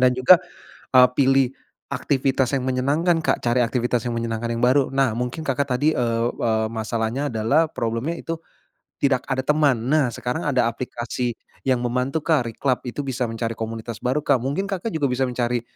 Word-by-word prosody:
Dan 125 Hz, 0 st, +5 dB
juga, 130 Hz, +8 st, +7 dB, 0.6 s
eee, 125 Hz, 0 st, +9 dB
pilih 135 Hz, -1 st, +4 dB, 0.4 s
aktivitas 135 Hz, -1 st, 0 dB
yang 130 Hz, -, -1 dB
menyenangkan, 145 Hz, +7 st, +1 dB
Kak, -, -, +1 dB
cari 120 Hz, +1 st, +2 dB
aktivitas 120 Hz, 0 st, 0 dB
yang 120 Hz, -, -2 dB
menyenangkan 115 Hz, 0 st, -2 dB
yang 115 Hz, -, -3 dB
baru. 130 Hz, +2 st, +4 dB
Nah 135 Hz, -3 st, +2 dB
mungkin 125 Hz, +6 st, -3 dB
Kakak 140 Hz, +1 st, 0 dB
tadi, 150 Hz, +4 st, +3 dB
eee, 115 Hz, -1 st, +1 dB
eee, 110 Hz, -1 st, 0 dB
masalahnya 115 Hz, +4 st, -2 dB
adalah 115 Hz, +9 st, +2 dB
problemnya 115 Hz, +8 st, -2 dB
itu, 165 Hz, 0 st, -4 dB, 0.7 s
tidak 135 Hz, -3 st, +2 dB
ada 130 Hz, -, +1 dB
teman. 140 Hz, -6 st, +2 dB
Nah 145 Hz, -5 st, +3 dB
sekarang 125 Hz, +6 st, -3 dB
ada 130 Hz, -5 st, +2 dB
aplikasi 120 Hz, +1 st, -3 dB, 0.3 s
yang 130 Hz, -2 st, +2 dB
membantu, 125 Hz, +5 st, -1 dB
Kak, 150 Hz, -5 st, +2 dB
Reclub 130 Hz, +3 st, -1 dB
itu 125 Hz, -, -4 dB
bisa 130 Hz, -2 st, -2 dB
mencari 115 Hz, 0 st, -3 dB
komunitas 115 Hz, 0 st, -5 dB
baru, 130 Hz, +4 st, +1 dB
Kak, -, -, +3 dB
mungkin 140 Hz, +9 st, -1 dB
Kakak 195 Hz, +3 st, -3 dB
juga 145 Hz, -3 st, +1 dB
bisa 130 Hz, +1 st, +1 dB
mencari 120 Hz, -1 st, -1 dB
125 Hz, 175 wpm, -23 LUFS, 120-140 Hz, 0.7 s, eee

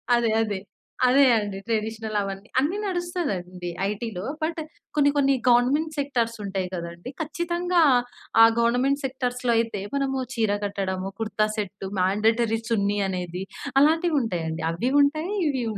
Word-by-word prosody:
అదే. 235 Hz, -1 st, +2 dB
అదే. 205 Hz, -3 st, -3 dB, 0.5 s
అదే 275 Hz, +3 st, +6 dB
అండి. 205 Hz, -2 st, -3 dB
ట్రెడిషనల్ 220 Hz, -1 st, -2 dB
అవన్నీ, 195 Hz, +1 st, -5 dB
అన్ని 320 Hz, +9 st, 0 dB
నడుస్తదండి 245 Hz, -, -3 dB, 0.2 s
ఐటీలో. 210 Hz, -2 st, -4 dB, 0.2 s
బట్ 330 Hz, +1 st, -1 dB, 0.4 s
కొన్ని, 285 Hz, -1 st, +4 dB
కొన్ని 275 Hz, -1 st, +4 dB, 0.2 s
గవర్నమెంట్ 285 Hz, +6 st, +3 dB
సెక్టార్స్ 235 Hz, -5 st, -1 dB
ఉంటాయి 190 Hz, -2 st, -2 dB
కదండీ! 170 Hz, +6 st, -7 dB
ఖచ్చితంగా 345 Hz, +2 st, 0 dB, 0.6 s
ఆ -, -, +11 dB, 0.2 s
గవర్నమెంట్ 250 Hz, +5 st, +2 dB
సెక్టార్సులో 250 Hz, -2 st, -1 dB
అయితే 225 Hz, -4 st, -1 dB
మనము 270 Hz, -1 st, 0 dB, 0.2 s
చీర 220 Hz, -3 st, +1 dB
కట్టడము, 195 Hz, -1 st, -3 dB
కుర్తా 215 Hz, -1 st, +1 dB
సెట్, 200 Hz, -1 st, -4 dB
మాండేటరీ 220 Hz, +4 st, +2 dB
చున్ని 205 Hz, -2 st, +1 dB
అనేది 180 Hz, 0 st, -4 dB, 0.4 s
అలాంటివుంటాయండి. 240 Hz, -, +1 dB
అవ్వి 240 Hz, +10 st, -1 dB
ఉంటాయి. 310 Hz, +6 st, 0 dB, 0.2 s
ఇవ్వి 265 Hz, -4 st, 0 dB
230 Hz, 125 wpm, -25 LUFS, 195-280 Hz, 0.6 s, ఆ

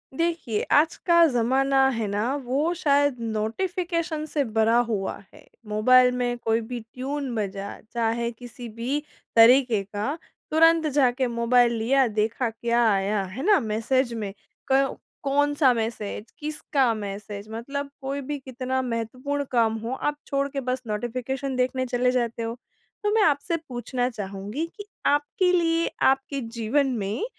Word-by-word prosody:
देखिए, 330 Hz, -10 st, -1 dB
आज 315 Hz, +3 st, +4 dB
का 340 Hz, -1 st, +6 dB
ज़माना 265 Hz, +1 st, +3 dB
है 225 Hz, -2 st, -2 dB
ना 210 Hz, +7 st, -1 dB
वो 285 Hz, +8 st, 0 dB
शायद 285 Hz, -5 st, +2 dB
नोटिफ़िकेशन 320 Hz, -, -2 dB
से 300 Hz, -2 st, 0 dB
भरा 225 Hz, -1 st, +2 dB
हुआ 195 Hz, -4 st, -2 dB, 0.2 s
है। -, -, -16 dB, 0.2 s
मोबाइल 250 Hz, +4 st, +5 dB
में 245 Hz, -1 st, -1 dB
कोई 225 Hz, -1 st, 0 dB
भी 240 Hz, +2 st, -5 dB
ट्यून 260 Hz, +4 st, -5 dB
बजा 200 Hz, -1 st, -3 dB, 0.2 s
चाहे 235 Hz, 0 st, 0 dB
किसी 240 Hz, +1 st, -10 dB
भी 255 Hz, +5 st, -1 dB, 0.4 s
तरीके 235 Hz, -1 st, +6 dB
का 205 Hz, +9 st, -3 dB, 0.3 s
तुरंत 325 Hz, 0 st, +5 dB
जाके 260 Hz, -3 st, +2 dB
मोबाइल 235 Hz, 0 st, +3 dB
लिया 260 Hz, +4 st, +3 dB
देखा 220 Hz, +3 st, 0 dB
क्या 235 Hz, +1 st, 0 dB
आया 200 Hz, +1 st, +1 dB
है 190 Hz, +8 st, -6 dB
ना? 415 Hz, -1 st, +5 dB
मैसेज 235 Hz, +2 st, 0 dB
में। 210 Hz, -4 st, -4 dB, 0.4 s
क 270 Hz, 0 st, +2 dB, 0.3 s
कौन-सा 290 Hz, 0 st, +3 dB
मैसेज? 220 Hz, -2 st, -3 dB
किसका 295 Hz, -5 st, 0 dB
मैसेज? 205 Hz, 0 st, -6 dB
मतलब 280 Hz, +5 st, -4 dB
कोई 275 Hz, +1 st, -3 dB
भी 290 Hz, +2 st, -4 dB
कितना 260 Hz, 0 st, -3 dB
महत्वपूर्ण 255 Hz, +4 st, -3 dB
काम 230 Hz, -3 st, +3 dB
हो 230 Hz, +3 st, -4 dB
आप 295 Hz, +2 st, -2 dB
छोड़ 275 Hz, 0 st, 0 dB
के 275 Hz, 0 st, -3 dB
बस 255 Hz, 0 st, -2 dB
नोटिफ़िकेशन 255 Hz, +5 st, -3 dB
देखने 255 Hz, +1 st, 0 dB
चले 250 Hz, 0 st, +1 dB
जाते 235 Hz, -2 st, -1 dB
हो। 225 Hz, -, -3 dB, 0.5 s
तो 415 Hz, -, +1 dB
मैं 445 Hz, -, +4 dB
आपसे 310 Hz, +2 st, +2 dB
पूछना 245 Hz, 0 st, -2 dB
चाहूँगी 205 Hz, +5 st, -5 dB
कि 410 Hz, -, -7 dB, 0.2 s
आपके 295 Hz, +6 st, +2 dB
लिए 335 Hz, -1 st, +2 dB, 0.2 s
आपके 270 Hz, +1 st, +1 dB, 0.2 s
जीवन 260 Hz, +6 st, +2 dB
में 205 Hz, -, -2 dB
250 Hz, 145 wpm, -25 LUFS, 225-285 Hz, 0.5 s, का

